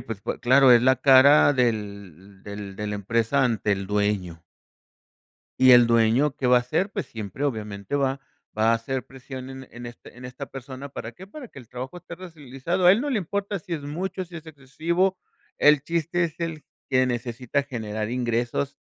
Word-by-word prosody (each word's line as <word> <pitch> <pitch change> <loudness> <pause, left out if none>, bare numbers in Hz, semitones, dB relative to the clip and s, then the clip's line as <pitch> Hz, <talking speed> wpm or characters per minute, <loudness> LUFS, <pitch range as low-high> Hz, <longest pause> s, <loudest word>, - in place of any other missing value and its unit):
Pues, 110 -3 -7
po - - -4
claro, 130 +1 +5
es 120 - +7
la 130 0 +4
cara 140 +3 +6
del 100 - -3
del 100 -1 -8
de 105 - -4
la 105 - -3
empresa 115 +6 0
ante 110 -3 0
el 95 -1 -3
dueño. 100 -5 -2 1.1
¿Y 130 0 +7
el 120 -1 +8
dueño 115 +5 +3
que 130 - -3
va 125 - +6
a - - +4
hacer? 160 +11 -1
Pues 200 -6 -4
siempre, 110 +5 -6
obviamente 105 -2 -4
va 135 0 0 0.4
va 110 +1 +3
a - - +4
hacer 125 +3 -3
presión 130 0 -10
en 130 0 -9
en - - -24
en 120 0 -8
este 120 0 -13
en 125 - -12
esta 125 +2 -7
persona, 135 +1 -9
¿para 115 -3 -7
qué? 190 +10 -13
Para 255 +3 -10
que - - -13
el 120 -3 -14
trabajo 130 +6 -7
esté 175 -1 -10
realizado. 170 0 -3
A 180 - +9
él 215 - +1
no 290 +2 -2
le 235 - +1
importa 200 +2 -3
si 170 - -10
es 155 -4 -3
mucho, 180 +6 -4
si 170 -1 -11
es 160 0 -11
excesivo. 165 +6 -1 0.4
El 150 -2 +5
chiste 170 +2 -1
es 165 0 -6
el 165 -2 -4 0.2
que 130 -1 +3
necesita 125 +2 -2
generar 110 -2 -4
ingresos, 120 +3 -2
130 Hz, 200 wpm, -24 LUFS, 115-150 Hz, 1.1 s, A